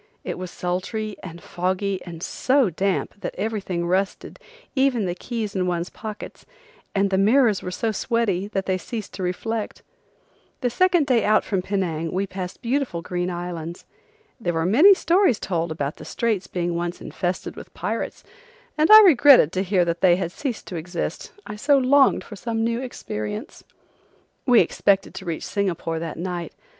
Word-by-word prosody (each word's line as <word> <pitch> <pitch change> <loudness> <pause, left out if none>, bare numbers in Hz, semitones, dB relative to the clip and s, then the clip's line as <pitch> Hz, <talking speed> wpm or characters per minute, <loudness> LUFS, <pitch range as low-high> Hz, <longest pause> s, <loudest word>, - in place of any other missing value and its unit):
It - - -5
was 185 -1 -5
sultry 195 +5 -3
and 170 -2 -9
foggy 185 +2 -2
and 170 -1 -8
so 260 -6 +2
damp 195 +3 -2
that - - -4
everything 195 -4 -2
rusted, 190 +3 -2 0.4
even 265 -5 +2
the 175 - -1
keys 215 +1 -5
in 185 -1 0
one's 175 0 -2
pockets, 215 -2 -8 0.5
and 195 0 +2
the 190 - +2
mirrors 220 0 +4
were - - -5
so 220 +5 -1
sweaty 210 -4 0
that 195 -2 -3
they 185 -1 0
ceased 220 +1 -6
to - - -7
reflect. 210 +5 -3 0.8
The 245 -2 0
second 355 +2 +3
day 245 -5 +2
out 215 +1 +3
from 195 -3 -1
Penang 175 -5 -2
we 190 +2 0
passed 185 -1 -7
beautiful 245 -9 -1
green 180 +1 -2
islands. 175 -1 -6 0.5
There 175 -7 -2
were 165 0 0
many 300 - +7
stories 345 - +3
told 170 -3 -2
about 145 -2 -3
the - - -10
straits 215 -5 -1
being 175 -1 -2
once 175 +1 -3
infested 180 0 -4
with - - -11
pirates, - - -4 0.6
and 310 - +4
I 430 0 +11
regretted 285 - +7
to 185 - -1
hear 190 -2 +2
that 170 0 -2
they 180 -2 +6
had 175 -2 -3
ceased 255 +1 -4
to 180 - -4
exist, 170 +1 -4
I 210 - -6
so 280 +6 +3
longed 270 +1 +4
for 210 - -10
some 225 +2 -2
new 230 +1 0
experience. 215 - -6 0.8
We 245 -3 +7
expected 195 -1 +1
to 190 0 -8
reach 165 -2 -4
Singapore 175 -5 -2
that 165 -1 -5
night. 175 0 -4
195 Hz, 170 wpm, -23 LUFS, 175-230 Hz, 0.8 s, I